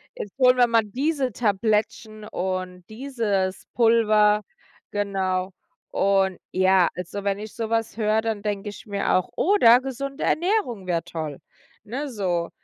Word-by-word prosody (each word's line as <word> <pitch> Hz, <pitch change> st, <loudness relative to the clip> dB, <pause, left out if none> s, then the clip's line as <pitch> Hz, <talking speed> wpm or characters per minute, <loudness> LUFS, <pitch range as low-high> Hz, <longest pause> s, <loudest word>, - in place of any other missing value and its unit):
jetzt 205 Hz, +5 st, -8 dB
holen 250 Hz, -1 st, +5 dB
wir 245 Hz, -1 st, +5 dB
mal 230 Hz, -1 st, +3 dB
diese 270 Hz, +3 st, -1 dB
Tablettchen 215 Hz, 0 st, -1 dB
und 185 Hz, -2 st, -4 dB
dieses 215 Hz, -6 st, -2 dB
Pulver“, 215 Hz, -3 st, +4 dB, 0.5 s
genau. 190 Hz, -2 st, -1 dB, 0.4 s
Und 195 Hz, -1 st, +1 dB
ja, 185 Hz, -1 st, +4 dB
also 180 Hz, +3 st, -6 dB
wenn 200 Hz, 0 st, 0 dB
ich 215 Hz, 0 st, -8 dB
so 225 Hz, -1 st, -4 dB
was 225 Hz, 0 st, -1 dB
höre, 215 Hz, 0 st, +2 dB
dann 220 Hz, -2 st, -2 dB
denke 205 Hz, 0 st, -3 dB
ich 205 Hz, -, -11 dB
mir 200 Hz, -1 st, -1 dB
auch 185 Hz, -, 0 dB
oder 260 Hz, -, +5 dB
gesunde 270 Hz, +1 st, -5 dB
Ernährung 335 Hz, -, 0 dB
wäre 170 Hz, -2 st, 0 dB
toll, 155 Hz, -4 st, -6 dB, 0.4 s
ne, 275 Hz, +6 st, -4 dB
so, 180 Hz, -7 st, -1 dB
210 Hz, 145 wpm, -24 LUFS, 190-235 Hz, 0.5 s, holen